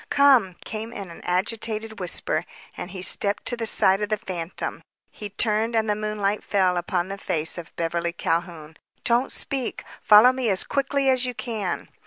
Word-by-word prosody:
"Come," 265 -10 +4
came 220 +1 -6
in 195 -6 -8
an - - -12
agitated 220 +4 -2
whisper, 180 -2 0 0.3
and 175 - -6
he 185 -1 -6
stepped 200 +1 +2
to 240 - 0
the 230 -1 -1
side 190 -1 +5
of 210 - -2
the 215 - +1
phantom. 185 -5 -5 0.3
She 210 - -7
turned 220 +2 0
and 220 -1 +1
the 210 - +2
moonlight 210 -1 -2
fell 185 -3 +1
upon 175 0 -1
the 195 0 -6
face 165 -5 0
of 165 - -11
Beverly 170 0 -1
Calhoun, 165 -2 -3 0.3
"Don't 240 +2 +1
speak. 270 -4 -1 0.2
Follow 215 +4 +7
me 255 -3 -1
as 190 -2 +1
quickly 275 0 -1
as 260 -1 +3
you 250 - -4
can." 220 -7 -4
210 Hz, 180 wpm, -24 LUFS, 180-230 Hz, 0.3 s, Follow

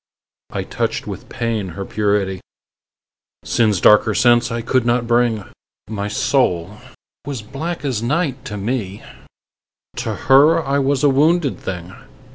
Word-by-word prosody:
I - - -3
touched - - -3
with - - -8
pain 115 -4 -2
her 100 - -4
purity; 100 -3 -1 1.0
Sin's 110 -5 +2
darker 105 +2 +5
sense 120 -1 +3
I 115 0 -3
could 130 +1 +1
not 120 0 +1
bring: 120 -3 +1 0.4
My 100 -1 -4
soul 105 -4 0 0.5
was 135 -6 -4
black 155 +7 -5
as 125 -6 -1
night 140 +1 -1
to 105 - -5
me: 105 -2 -3 0.9
To - - -3
her 150 +5 +4
I 140 +1 +1
was 135 0 0
a 145 - +6
wounded 150 +2 +2
thing. 90 -1 -6
120 Hz, 135 wpm, -19 LUFS, 105-135 Hz, 1.0 s, a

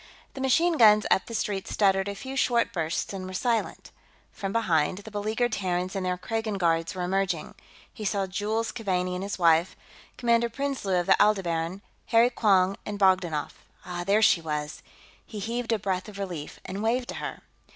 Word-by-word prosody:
The 270 - -7
machine 325 +5 +2
guns 215 -2 +7
up - - +3
the 230 - -5
street 200 -3 -2
stuttered 195 -1 +2
a 200 - -4
few 265 +7 -7
short 240 -3 +2
bursts 165 +2 -2
and 185 -1 -5
were 185 - -7
silent. 235 +2 -1 0.4
From 195 -1 -5
behind, 180 -7 +1
the 205 +2 -10
beleaguered 215 +4 -1
Terrans 185 -2 -2
and 195 - -2
their 180 0 -1
Kragan 220 +2 -3
guards 165 0 +1
were 180 - -3
emerging. 190 +1 -1 0.4
He 215 - -8
saw 200 -1 0
Jules 210 +4 -2
Keaveney 185 -4 -1
and 180 - -3
his 200 +1 -4
wife, 170 0 +3 0.4
Commander 235 -1 +2
Prinsloo 265 -6 -2
of 175 - -1
the - - +4
Aldebaran, 185 -3 +1 0.2
Harry 235 +1 +4
Quong 195 -4 +3
and 205 -1 -5
Bogdanoff. 185 -6 +1 0.2
Ah, 175 -1 -4
there 205 +4 +3
she 170 - +5
was! 150 -1 -4 0.4
He 215 - -10
heaved 230 +3 -3
a 225 - +3
breath 195 0 -2
of 200 - -11
relief 175 -7 -6
and 195 +2 -5
waved 240 +3 0
to - - -4
her. - - -6
195 Hz, 185 wpm, -27 LUFS, 180-225 Hz, 0.4 s, guns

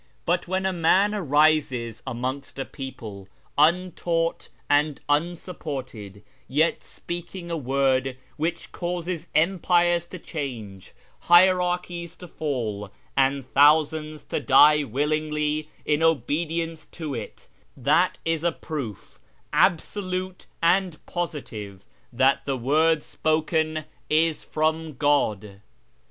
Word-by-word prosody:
But 175 +1 0
when 190 +1 -1
a 190 - +1
man 185 +5 +3
arises 145 - +2
amongst 130 +3 -4
a 135 - -3
people, 110 -8 -8 0.3
untaught 170 +1 +1 0.2
and 145 0 +2
unsupported, 145 - -3 0.2
yet 155 +5 +1
speaking 175 0 -7
a - - 0
word 135 -2 +1 0.2
which 165 +2 -3
causes 175 -1 -4
empires 175 0 +3
to 185 - -8
change, 120 - -7 0.3
hierarchies 180 -1 +3
to 180 - -11
fall, 115 -11 -3 0.3
and 135 0 +2
thousands 150 +2 +3
to - - -3
die 150 +2 +6
willingly 150 +3 -1 0.2
in 150 +1 +1
obedience 165 +2 0
to 155 -4 -5
it, 115 -4 -7 0.3
that - - +2
is 165 -1 0
a 170 - +2
proof 140 - -7 0.3
absolute 185 +1 0 0.2
and 180 -1 +3
positive 110 - -5 0.3
that 130 +3 +3
the 135 -2 -1
word 150 +5 +2
spoken 155 0 0 0.2
is 160 0 +2
from 155 0 -1
God. 110 -8 0
155 Hz, 105 wpm, -25 LUFS, 135-170 Hz, 0.3 s, die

